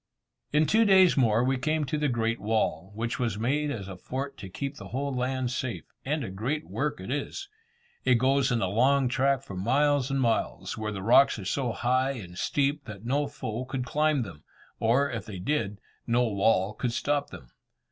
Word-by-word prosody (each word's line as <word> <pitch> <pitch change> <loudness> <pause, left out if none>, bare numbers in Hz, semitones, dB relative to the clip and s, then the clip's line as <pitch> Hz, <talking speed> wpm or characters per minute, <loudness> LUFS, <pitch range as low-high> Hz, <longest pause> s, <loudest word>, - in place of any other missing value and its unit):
In 150 +1 +4
two 220 +7 +4
days 190 -4 +6
more 115 -3 +3
we 130 0 +1
came 155 +1 0
to 135 - -2
the 150 - +1
Great 115 -2 0
Wall, 105 -5 -1
which 115 +2 -3
was 115 -5 -1
made 145 +7 0
as 105 -9 -4
a 95 - -7
fort 135 +8 -5
to 95 - -8
keep 140 +8 -4
the - - -9
whole 140 +2 -3
land 130 0 -1
safe, 120 -9 -3 0.2
and 150 +1 -1
a 100 - -5
great 130 +11 -3
work 150 -5 -2
it 95 +6 -6
is. 145 - -3 0.6
It 130 -1 +4
goes 130 +3 +2
in 120 -4 +1
a - - +1
long 130 +6 +3
track 135 +1 +1
for 100 - -9
miles 135 +7 +2
and 135 0 0
miles, 115 -3 0
where 110 0 -3
the 95 -2 -5
rocks 120 +5 +5
are 100 - -7
so 125 +4 -1
high 130 +4 +1
and 95 -9 -9
steep 140 +7 0
that 110 -1 -9
no 140 +4 +1
foe 110 +3 -5
could 130 -1 -3
climb 150 0 +1
them; 85 -8 -10 0.4
or, 125 +5 +3
if 115 -2 -4
they 100 -3 -6
did, 105 -1 -1 0.3
no 120 +1 +3
wall 105 -2 +2
could 120 +1 -2
stop 145 +3 0
them. 60 -3 -12
125 Hz, 205 wpm, -28 LUFS, 110-140 Hz, 0.6 s, days